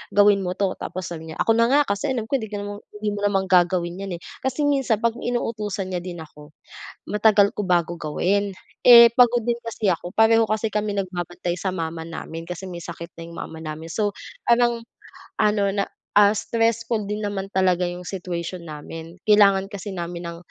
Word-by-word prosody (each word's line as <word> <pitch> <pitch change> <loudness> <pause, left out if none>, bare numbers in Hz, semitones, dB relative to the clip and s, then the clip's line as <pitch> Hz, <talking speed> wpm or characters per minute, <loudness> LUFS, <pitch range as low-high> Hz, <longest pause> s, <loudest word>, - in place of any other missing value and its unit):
"Gawin 205 -1 +5
mo 180 - -1
'to" 195 -2 +1
tapos 185 -1 -5
sasabihin 160 -1 -7
niya, - - -15
"ako - - +3
na 230 - +4
nga, 290 - +6
kasi 200 +8 -1
alam 230 -4 -2
ko - - +1
hindi 220 - -6
ka 205 - -3
naman 205 0 -6 0.2
hindi 210 0 -1
mo - - -4
naman 195 -1 +1
gagawin 175 0 +2
'yan, 195 -3 -4
eh". - - -41 0.2
Kasi 265 +3 0
minsan 270 -7 +1
pag 235 -1 +2
inuutusan 215 -5 -2
niya 180 - -2
din 175 -2 -7
ako 150 -1 -15 0.6
matagal 210 -1 +4
ko - - -1
bago 175 -2 +2
gawin, 195 +6 0 0.3
eh 235 -1 +10
pagod 240 -2 +5
din 240 -1 +1
kasi 225 -3 -1
ako, 175 +1 -7
pareho 225 0 +5
kasi 215 +1 0
kami 210 -1 -1
nagbabantay 175 -2 -3
sa 190 - -1
mama 165 -1 -4
namin 165 0 -7
kasi 180 +2 -6
may 175 -1 -7
sakit 170 0 -8
na 165 - -7
yung 170 - -11
mama 160 - -7
namin. 155 0 -6
So, 205 +2 0 0.3
parang 235 -1 +3 0.6
ano 210 -1 +3
na, 200 - +1 0.3
ah, 205 0 +7
stressful 230 +1 0
din 210 +1 -3
naman 195 -1 -3
talaga 185 -2 +2
yung 175 0 -7
situation 180 -1 -5
namin 165 +2 -9
kailangan 200 -2 +6
kasi 200 0 -6
namin 170 0 -5
ng 170 - -8
200 Hz, 195 wpm, -23 LUFS, 175-215 Hz, 0.6 s, eh